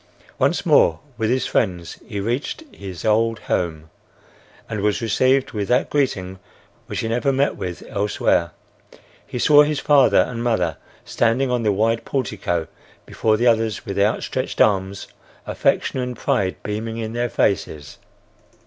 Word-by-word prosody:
Once - - +1
more 80 -1 +4 0.2
with 110 -2 -1
his 130 +1 +1
friends 90 -6 -1
he 105 -4 -4
reached 120 - -3
his 95 -3 -8
old 115 +1 +2
home 80 -3 -2 0.8
and 105 -2 -4
was 105 0 +1
received 130 +4 +2
with 105 -3 -3
that 125 +1 +1
greeting 95 -10 -1 0.5
which - - -3
he - - -2
never 120 +5 +1
met 135 +2 +1
with 90 -2 -6
elsewhere. 100 -4 0 0.8
He - - -5
saw 145 +4 +6
his 150 -1 +1
father 140 -2 +4
and 120 -1 -5
mother 90 -10 0 0.3
standing 125 +3 +1
on 125 -1 +1
the 110 -2 +2
wide 115 +3 +1
portico 100 - -2 0.4
before 110 -1 +1
the 120 - 0
others 115 -3 +1
with 100 0 -3
outstretched 105 +2 -1
arms, 100 -1 +2 0.4
affection - - 0
and 125 -2 -3
pride 95 -1 0
beaming 110 +2 -4
in 110 -1 -4
their 120 +1 -1
faces. 75 -10 -1
110 Hz, 150 wpm, -21 LUFS, 100-125 Hz, 0.8 s, saw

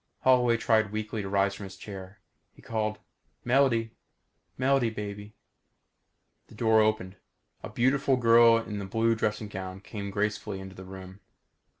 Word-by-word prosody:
Holloway 125 -2 +4
tried 110 -3 +2
weakly 110 0 -3
to 100 - -5
rise 100 0 +2
from 100 - -8
his 95 0 -10
chair. 95 0 -10 0.3
He - - -17
called, 110 -1 -2 0.5
"Melody 120 -3 +2 0.7
Melody 135 -2 +2
baby!" 105 -1 -7 1.1
The - - -16
door 110 -1 +4
opened. 110 -3 0 0.4
A - - -7
beautiful 135 +2 +2
girl 115 -1 +6
in 105 -3 -4
a - - -5
blue 115 +4 +1
dressing 110 -1 -2
gown 95 -1 -7
came 100 0 -7
gracefully 105 0 -2
into 95 0 -9
the 95 - -10
room. 95 0 -10
110 Hz, 145 wpm, -28 LUFS, 100-115 Hz, 1.1 s, girl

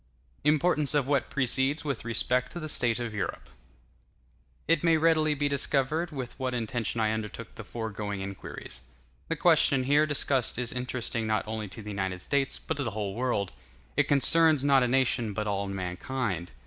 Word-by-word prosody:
Importance 150 0 +2
Of 140 -3 +2
What 140 -1 +1
Precedes 140 +2 +1
With 140 -2 -2
Respect 125 +2 0
To 175 - -5
The 155 - -5
State 120 -4 +2
Of 120 -2 -4
Europe 105 - -4 1.2
It 165 -1 +3
may 165 -1 +4
readily 155 -1 +3
be 145 0 0
discovered 140 +3 +1
with 130 -5 -6
what 130 -1 -1
intention 115 -1 -2
I 110 -1 +2
undertook 110 +1 -5
the 115 - -8
foregoing 105 0 -4
inquiries. 95 -9 -7 0.5
The - - -1
question 135 -2 +4
here 145 +3 +3
discussed 135 -5 +1
is 125 -1 -1
interesting 125 -3 -2
not 110 0 0
only 110 -1 -4
to 110 +3 -9
the 105 - -6
United 95 -2 -2
States, 140 +7 0
but - - -4
to 140 - -1
the 110 -4 -4
whole 100 -2 -2
world; 115 -5 -1 0.4
it - - +2
concerns, 150 +1 +4
not 140 -2 +5
a 125 - +2
nation, 120 -4 +1
but 105 +1 -2
all 100 -1 -1
mankind. 95 - -3
125 Hz, 175 wpm, -28 LUFS, 110-140 Hz, 1.2 s, not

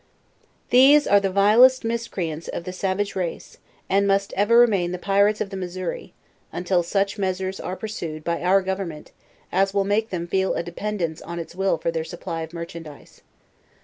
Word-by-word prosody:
These 275 +4 +7
are 200 - +5
the 195 -1 -1
vilest 220 +7 +5
miscreants 185 -9 -3
of - - -5
the 185 - -6
savage 195 +2 -2
race, 180 -3 -5 0.3
and 200 +1 +2
must 195 0 +1
ever 205 +4 +3
remain 200 -8 +4
the - - -3
pirates 200 +3 +2
of 200 - -3
the - - -5
Missouri, 185 -1 -5 0.4
until 180 0 0
such 195 +4 -1
measure's 190 0 -2
are 185 - -4
pursued, 170 -8 -6
by 170 +1 -2
our 190 +2 +3
government, 190 -5 -5 0.4
as 195 +2 +1
will 200 - +3
make 215 +3 0
them 175 -2 -4
ibel 190 +1 0
a - - -1
dependence 175 -2 -4
on 170 +1 -7
its 170 0 -6
will 190 -1 0
for 165 +1 -2
their 165 -1 -2
supply 165 0 -6
of 160 0 -6
merchandise. 170 -3 -10
190 Hz, 180 wpm, -23 LUFS, 170-200 Hz, 0.4 s, These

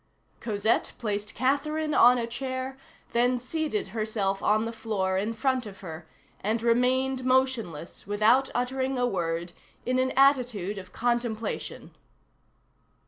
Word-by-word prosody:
Cosette 215 0 0
placed 210 -2 -3
Catherine 300 +4 0
on 245 -1 +7
a 235 - -1
chair, 260 +2 -4 0.4
then 245 +1 +3
seated 315 - -2
herself 215 -3 -1
on 215 +1 +2
the 230 - -3
floor 210 -4 -1
in 205 +4 0
front 255 +1 0
of 195 -2 -11
her, 160 -3 -8 0.3
and 220 +3 -1
remained 255 +2 +2
motionless, 255 - 0
without 220 +6 +3
uttering 260 +2 -1
a 245 - +2
word, 170 -5 -2 0.3
in 255 +1 +1
an 260 0 +2
attitude 245 -8 +3
of 185 -1 -12
contemplation. 235 -2 -2
235 Hz, 130 wpm, -27 LUFS, 205-260 Hz, 0.4 s, on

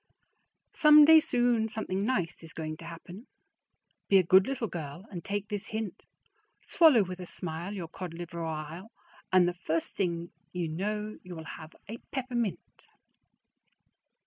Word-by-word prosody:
Someday 300 0 +8
soon 240 -5 +1
something 200 -3 -3
nice 180 -9 -1
is 165 - -6
going 155 -1 -5
to 165 - -11
happen; 175 +7 -10 0.8
Be 195 - +6
a 185 - +5
good 185 +2 +5
little 265 -4 -2
girl 170 0 -7
and 175 -4 -6
take 205 0 -3
this 205 0 -4
hint: 220 -3 -5 0.6
Swallow 305 -10 +5
with 185 0 -7
a 180 - -7
smile 170 +4 -3
your 175 -4 -5
cod 170 0 -7
liver 170 0 -6
ile, 160 +5 -5 0.4
And 185 -1 +5
the 175 - 0
first 165 -2 -2
thing 170 -3 -2 0.2
you 175 -2 -2
know 210 +6 -3
you 180 -1 -9
will 160 - -7
have 160 0 -10
a 225 +3 -6
peppermint. 240 - -4
185 Hz, 150 wpm, -29 LUFS, 170-220 Hz, 0.8 s, Someday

